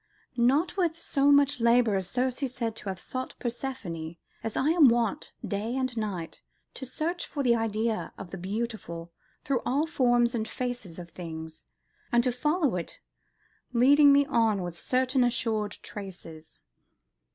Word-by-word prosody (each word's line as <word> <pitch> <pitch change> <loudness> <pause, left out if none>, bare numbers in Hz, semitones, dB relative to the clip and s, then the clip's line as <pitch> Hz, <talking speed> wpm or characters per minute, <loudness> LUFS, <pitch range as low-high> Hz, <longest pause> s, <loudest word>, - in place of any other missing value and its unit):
Not 270 +11 +2
with 335 -3 +1
so 280 0 +3
much 285 -2 +4
labour 235 -2 +4
is 190 -1 -2
Ceres 255 +2 -1
said 225 -2 -2
to 200 - -5
have 190 - -4
sought 255 0 -5
Proserpine, 205 -10 -5 0.3
as 225 - -3
I 285 - +2
am 320 -5 +7
wont, 235 -3 0 0.2
day 215 +5 -2
and 255 -2 -1
night, 200 -7 -4 0.3
to 265 - -5
search 330 +7 -2
for 285 - -3
the 240 -2 +4
idea 225 0 -1
of 195 -3 -9
the 195 - -5
beautiful 190 -4 -4 0.3
through 265 -4 0
all 280 +5 +1
forms 245 -6 +2
and 220 -2 -2
faces 245 -9 -4
of 170 -1 -9
things, 160 -2 -8 0.5
and 240 0 +4
to 250 - +2
follow 295 - +1
it 170 - -6 0.7
leading 285 +4 +6
me 280 0 +5
on 225 -8 +2
with 175 -1 -5
certain 255 +6 +1
assured 220 -4 0
traces." 175 -6 -9
235 Hz, 155 wpm, -28 LUFS, 200-265 Hz, 0.7 s, am